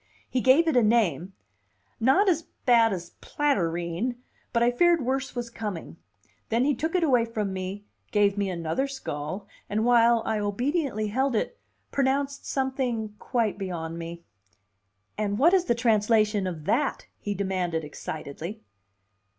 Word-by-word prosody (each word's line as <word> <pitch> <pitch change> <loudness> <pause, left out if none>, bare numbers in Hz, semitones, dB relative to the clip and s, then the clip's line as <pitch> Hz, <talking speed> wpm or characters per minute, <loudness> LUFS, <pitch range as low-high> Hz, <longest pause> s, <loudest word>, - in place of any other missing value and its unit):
He 255 - -1
gave 275 +7 +5
it 320 - +2
a 245 - +6
name, 195 - +2 0.7
not 270 - +4
as 330 -3 +1 0.2
bad 230 -2 +5
as 175 -2 -5
platyrrhine, 175 - -1 0.4
but 235 -1 +2
I 240 - +4
feared 340 +1 +3
worse 265 +1 -1
was 240 -1 -4
coming; 205 -8 -6 0.5
then 235 +3 +2
he 290 - +3
took 320 +5 -2
it 360 - +3
away 255 -7 +4
from 215 -4 -3
me, 190 +2 -5 0.2
gave 205 -2 +3
me 200 -1 -1
another 170 +9 -1
skull, 185 - -5 0.2
and 215 +2 0
while 235 -1 +5
I 215 - 0
obediently 215 - -1
held 260 +3 +1
it, 475 - -2 0.3
pronounced 280 +1 0
something 255 -5 -1
quite 230 -5 -1
beyond 170 -3 -4
me. 170 +1 -7 1.0
"And 205 -1 0
what 325 - +5
is 370 -2 +4
the 235 - +2
translation 215 -3 +2
of 160 -4 -6
that?" 290 - 0
he 205 -1 -3
demanded 185 -4 -1
excitedly. 155 +6 -7
225 Hz, 150 wpm, -26 LUFS, 190-265 Hz, 1.0 s, a